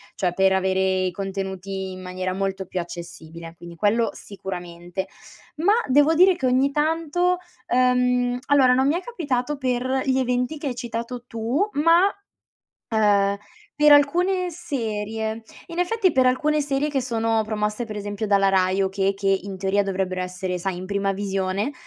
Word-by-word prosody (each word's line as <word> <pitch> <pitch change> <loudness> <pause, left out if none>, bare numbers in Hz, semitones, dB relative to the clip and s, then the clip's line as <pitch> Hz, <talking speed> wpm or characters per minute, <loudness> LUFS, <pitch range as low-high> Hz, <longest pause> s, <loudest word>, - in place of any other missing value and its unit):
cioè 180 -3 0
per 190 +1 +3
avere 190 0 +1 0.2
i 185 -1 0
contenuti 190 0 -5
in 185 - -8
maniera 185 0 -4
molto 195 0 -2
più 185 - -4
accessibile, 170 -1 -8
quindi 170 0 -11
quello 210 +4 +1
sicuramente. 180 -1 -7 0.5
Ma 350 +7 +3
devo 290 +4 +4
dire 365 +2 +5
che 265 - -2
ogni 260 +2 +3
tanto, 330 +4 +1 0.3
ehm 250 0 +2
allora, 275 -3 +5
non 260 +1 +3
mi 295 - +2
è 350 - -2
capitato 295 - -2
per 260 0 -1
gli 265 -1 +2
eventi 250 +3 -1
che 295 - -5
hai 255 - -3
citato 240 0 -5
tu, 240 - -1
ma, 335 +5 +5 0.8
ehm, 205 -3 +3 0.4
per 300 0 +6
alcune 355 +6 +3
serie. 220 -8 -4 0.2
In 340 -1 -5
effetti, 375 -1 +2
per 260 -1 +4
alcune 300 +4 +2
serie 280 0 -1
che 285 -3 -1
sono 225 -2 0
promosse, 210 +1 -2
per 215 -2 -6
esempio, 205 +1 -4
dalla 200 -1 +3
Rai 190 0 +2
o 190 - +2
che 195 +1 0
che 195 0 -3 0.2
in 195 -1 -6
teoria 195 +2 +1
dovrebbero 185 -1 -2
essere, 180 0 -3
sai, 180 +1 -3
in 185 - -6
prima 200 0 -1
visione, 195 +4 -2
220 Hz, 165 wpm, -23 LUFS, 190-275 Hz, 0.8 s, per